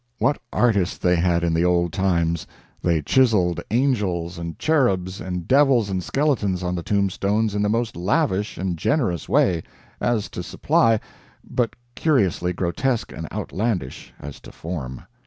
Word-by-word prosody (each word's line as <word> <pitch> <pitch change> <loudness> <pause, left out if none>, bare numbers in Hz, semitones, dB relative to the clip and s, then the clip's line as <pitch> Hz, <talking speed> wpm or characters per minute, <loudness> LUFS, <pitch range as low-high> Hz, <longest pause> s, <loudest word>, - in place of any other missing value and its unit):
What 145 - +1
artists 100 -7 +2
they 90 0 +2
had 85 0 +1
in 85 -1 +1
the 80 +1 +2
old 85 -2 +2
times! 85 -4 0 0.3
They 85 -3 +1
chiseled 105 - +3
angels 100 -9 0
and 85 -1 -6
cherubs 100 - +1
and 90 -2 -4
devils 130 -7 +4
and 95 -1 -2
skeletons 110 - 0
on 90 0 -1
the 90 - -2
tombstones 100 +3 0
in 105 - 0
the 105 - +1
most 115 0 -1
lavish 105 - 0
and 95 -2 -2
generous 110 - 0
way 85 -4 +3 0.4
as 115 -4 0
to - - -6
supply 115 -1 +2 0.5
but 120 -2 -1 0.2
curiously 95 - +1
grotesque 105 +8 -1
and - - -7
outlandish 95 - -3
as 75 -1 -8
to - - -13
form. 70 -7 -6
95 Hz, 150 wpm, -23 LUFS, 85-115 Hz, 0.5 s, devils